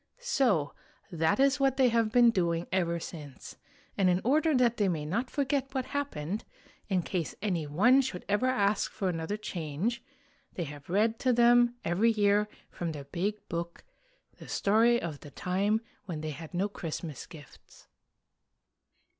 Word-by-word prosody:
So 250 Hz, -, +1 dB, 0.4 s
that 165 Hz, +5 st, +1 dB
is 275 Hz, +1 st, +4 dB
what 270 Hz, -1 st, +2 dB
they 260 Hz, -2 st, +5 dB
have 230 Hz, -2 st, +1 dB
been 240 Hz, 0 st, +6 dB
doing 170 Hz, -4 st, 0 dB
ever 170 Hz, -2 st, 0 dB
since; 150 Hz, -5 st, -9 dB, 0.4 s
and 190 Hz, -2 st, +3 dB
in 180 Hz, 0 st, +3 dB
order 305 Hz, +5 st, +3 dB
that 240 Hz, -2 st, +3 dB
they 205 Hz, -, +2 dB
may 155 Hz, -4 st, -2 dB
not 230 Hz, +11 st, -2 dB
forget 275 Hz, -1 st, -1 dB
what 260 Hz, -1 st, 0 dB
happened, 215 Hz, -, -3 dB, 0.5 s
in 185 Hz, -3 st, +1 dB
case 175 Hz, -3 st, -3 dB
any 175 Hz, -7 st, -1 dB
one 230 Hz, -, +5 dB
should 250 Hz, -9 st, -5 dB
ever 205 Hz, +6 st, +1 dB
ask 210 Hz, -5 st, +1 dB
for 190 Hz, -, -2 dB
another 165 Hz, +4 st, -3 dB
change, 180 Hz, +3 st, -3 dB, 0.5 s
they 175 Hz, -, -3 dB
have 145 Hz, -1 st, -9 dB
read 220 Hz, +5 st, +2 dB
to 255 Hz, -, +2 dB
them 240 Hz, 0 st, +5 dB
every 190 Hz, +7 st, +3 dB
year 210 Hz, -1 st, +3 dB, 0.2 s
from 170 Hz, -2 st, -4 dB
their 145 Hz, -2 st, -7 dB
Big 190 Hz, +8 st, -3 dB
Book 170 Hz, 0 st, -5 dB, 0.6 s
the -, -, -11 dB
story 230 Hz, +4 st, +3 dB
of 155 Hz, -7 st, -5 dB
the 145 Hz, -, -11 dB
time 200 Hz, +8 st, 0 dB, 0.2 s
when 165 Hz, -5 st, -5 dB
they 155 Hz, 0 st, -3 dB
had 160 Hz, +3 st, -9 dB
no 190 Hz, +3 st, +1 dB
Christmas 165 Hz, -6 st, -6 dB
gifts. 150 Hz, -7 st, -15 dB
200 Hz, 165 wpm, -29 LUFS, 170-240 Hz, 0.6 s, been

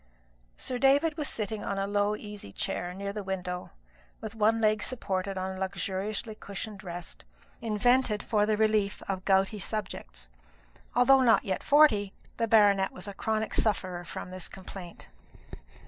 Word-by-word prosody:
Sir 250 Hz, -1 st, -3 dB
David 285 Hz, +4 st, +4 dB
was 300 Hz, -3 st, -2 dB
sitting 215 Hz, -1 st, -3 dB
on 200 Hz, -, -2 dB
a 195 Hz, -, 0 dB
low 205 Hz, +1 st, +1 dB
easy 210 Hz, -, -8 dB
chair 175 Hz, -, -3 dB
near 200 Hz, +2 st, -5 dB
the 210 Hz, -1 st, -4 dB
window, 180 Hz, -2 st, -4 dB, 0.5 s
with 220 Hz, -1 st, -6 dB
one 225 Hz, +1 st, +3 dB
leg 215 Hz, -1 st, +3 dB
supported 195 Hz, -6 st, -2 dB
on 190 Hz, 0 st, -3 dB
a -, -, -8 dB
luxuriously 195 Hz, +3 st, -3 dB
cushioned 200 Hz, -1 st, -7 dB
rest, 175 Hz, -2 st, -7 dB, 0.4 s
invented 230 Hz, 0 st, +2 dB
for 210 Hz, -2 st, +2 dB
the 215 Hz, -1 st, +2 dB
relief 215 Hz, -2 st, +1 dB
of 190 Hz, -1 st, -3 dB
gouty 195 Hz, +2 st, +3 dB
subjects. 170 Hz, -, -5 dB, 0.7 s
Although 265 Hz, +2 st, +6 dB
not 235 Hz, -3 st, +4 dB
yet 190 Hz, -2 st, -1 dB
forty, 220 Hz, -10 st, +5 dB, 0.2 s
the 230 Hz, -, +1 dB
baronet 205 Hz, -3 st, +5 dB
was 185 Hz, +2 st, -7 dB
a 200 Hz, -, -5 dB
chronic 220 Hz, +2 st, -1 dB
sufferer 185 Hz, -4 st, 0 dB
from 175 Hz, +1 st, -7 dB
this 185 Hz, -1 st, -6 dB
complaint. 185 Hz, -2 st, -10 dB
205 Hz, 155 wpm, -29 LUFS, 190-220 Hz, 0.7 s, Although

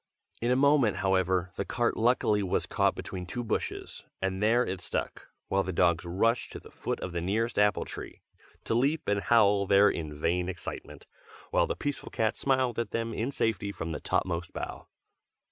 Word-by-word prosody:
In 120 Hz, -, +1 dB
a 125 Hz, -, +4 dB
moment, 135 Hz, -7 st, +4 dB
however, 95 Hz, -1 st, +1 dB
the -, -, 0 dB
cart 120 Hz, +3 st, 0 dB
luckily 110 Hz, -3 st, +2 dB
was 95 Hz, -2 st, 0 dB
caught -, -, +1 dB
between 90 Hz, -2 st, -6 dB
two 120 Hz, +6 st, -4 dB
bushes, 115 Hz, -, -3 dB, 0.2 s
and 95 Hz, 0 st, -2 dB
there 115 Hz, +4 st, +4 dB
it 95 Hz, -1 st, -4 dB
stuck, -, -, -4 dB, 0.2 s
while 95 Hz, -, +2 dB
the 95 Hz, -, -3 dB
dogs 85 Hz, -2 st, +2 dB
rushed 115 Hz, +8 st, +1 dB
to -, -, -6 dB
the -, -, -15 dB
foot -, -, -3 dB
of 90 Hz, -, -4 dB
the 85 Hz, 0 st, -2 dB
nearest 110 Hz, +6 st, 0 dB
apple 105 Hz, 0 st, +3 dB
tree, -, -, -9 dB, 0.4 s
to -, -, -1 dB
leap 140 Hz, +7 st, +1 dB
and 100 Hz, 0 st, +1 dB
howl 100 Hz, -4 st, +4 dB
there 100 Hz, +1 st, +6 dB
in 75 Hz, -2 st, -5 dB
vain 90 Hz, +3 st, 0 dB
excitement, 90 Hz, -2 st, -7 dB, 0.5 s
while -, -, +3 dB
the -, -, -2 dB
peaceful 145 Hz, -1 st, -4 dB
cat 110 Hz, -1 st, 0 dB
smiled 130 Hz, -3 st, +1 dB
at 115 Hz, -3 st, -2 dB
them 115 Hz, +1 st, -2 dB
in 115 Hz, +5 st, -2 dB
safety 110 Hz, -6 st, -1 dB
from 80 Hz, -4 st, -5 dB
the 80 Hz, -, -3 dB
topmost 85 Hz, -1 st, -1 dB
bough. -, -, -6 dB
100 Hz, 190 wpm, -29 LUFS, 90-115 Hz, 0.5 s, there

